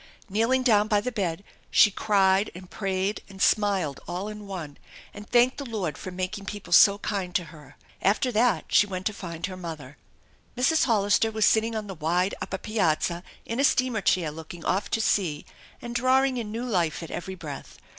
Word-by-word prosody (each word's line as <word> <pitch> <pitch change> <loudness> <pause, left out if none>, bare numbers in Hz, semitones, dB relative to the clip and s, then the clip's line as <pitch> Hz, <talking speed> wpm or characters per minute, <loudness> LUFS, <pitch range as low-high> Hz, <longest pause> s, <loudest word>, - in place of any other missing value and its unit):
Kneeling 230 +6 +2
down 215 -4 +4
by 210 -2 +3
the 250 +5 -3
bed 195 -5 -2 0.3
she 215 - +6
cried 195 -1 +2
and 180 0 -11
prayed 195 0 -2
and 195 -1 -12
smiled 195 -9 +2
all 180 +4 -4
in 210 -1 -9
one, 165 -7 -7 0.3
and 205 +1 -11
thanked 245 +3 +3
the - - -3
Lord 205 - -3
for - - -7
making 185 +2 -4
people 205 -3 -5
so 200 +3 +7
kind 195 -3 -4
to 180 - +2
her. 150 -3 -15 0.3
After 220 +6 +2
that 235 +1 +2
she 205 - +4
went 185 -2 -5
to 215 - 0
find 170 -3 -6
her 185 -1 -6
mother. 160 -6 -8 0.6
Mrs. 310 +6 +3
Hollister 215 -2 +2
was 220 -1 +1
sitting 225 +1 +2
on 215 -1 -3
the 195 - -6
wide 175 +4 0
upper 190 - -3
piazza 175 -5 0 0.2
in 230 +3 -4
a - - +3
steamer 255 -5 +2
chair 175 -4 +1
looking 160 +2 -10
off 195 +3 0
to 225 - 0
sea 170 -9 0 0.4
and 240 0 -5
drawing 255 +2 +2
in 220 -3 -4
new 230 +3 -4
life 175 -8 0
at 165 - -8
every 190 +2 -5
breath. 150 -6 -9
200 Hz, 195 wpm, -26 LUFS, 180-220 Hz, 0.6 s, so